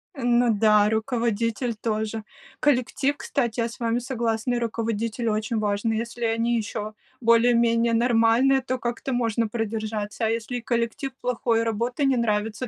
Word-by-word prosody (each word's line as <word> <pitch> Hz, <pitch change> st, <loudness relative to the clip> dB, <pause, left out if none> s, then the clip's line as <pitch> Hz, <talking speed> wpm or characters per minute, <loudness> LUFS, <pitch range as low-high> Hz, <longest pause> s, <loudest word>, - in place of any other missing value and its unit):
Ну 245 Hz, -2 st, +2 dB
да, 210 Hz, 0 st, +4 dB
руководитель 230 Hz, +1 st, -1 dB
тоже. 220 Hz, 0 st, -3 dB, 0.4 s
Коллектив, 275 Hz, +1 st, +1 dB
кстати, 235 Hz, -6 st, -1 dB
я 230 Hz, -, -1 dB
с 230 Hz, -, -12 dB
вами 235 Hz, 0 st, 0 dB
согласна, 240 Hz, -1 st, -1 dB
и -, -, 0 dB
руководитель 230 Hz, 0 st, -2 dB
очень 215 Hz, +2 st, -1 dB
важны. 210 Hz, +1 st, 0 dB
Если 235 Hz, +1 st, -3 dB
они 230 Hz, +1 st, +1 dB
еще 215 Hz, 0 st, -4 dB, 0.3 s
более-менее 235 Hz, 0 st, +4 dB
нормальные, 240 Hz, +3 st, +3 dB
то 255 Hz, 0 st, -2 dB
как-то 240 Hz, +2 st, -3 dB
можно 230 Hz, -2 st, 0 dB
продержаться, 215 Hz, 0 st, -3 dB
а -, -, +1 dB
если 230 Hz, +2 st, -2 dB
и 240 Hz, -, -6 dB
коллектив 235 Hz, +3 st, -2 dB
плохой, 235 Hz, -2 st, 0 dB
и -, -, 0 dB
работа 235 Hz, +5 st, -1 dB
не 270 Hz, -2 st, +3 dB
нравится, 220 Hz, +1 st, -1 dB
230 Hz, 150 wpm, -24 LUFS, 220-240 Hz, 0.4 s, да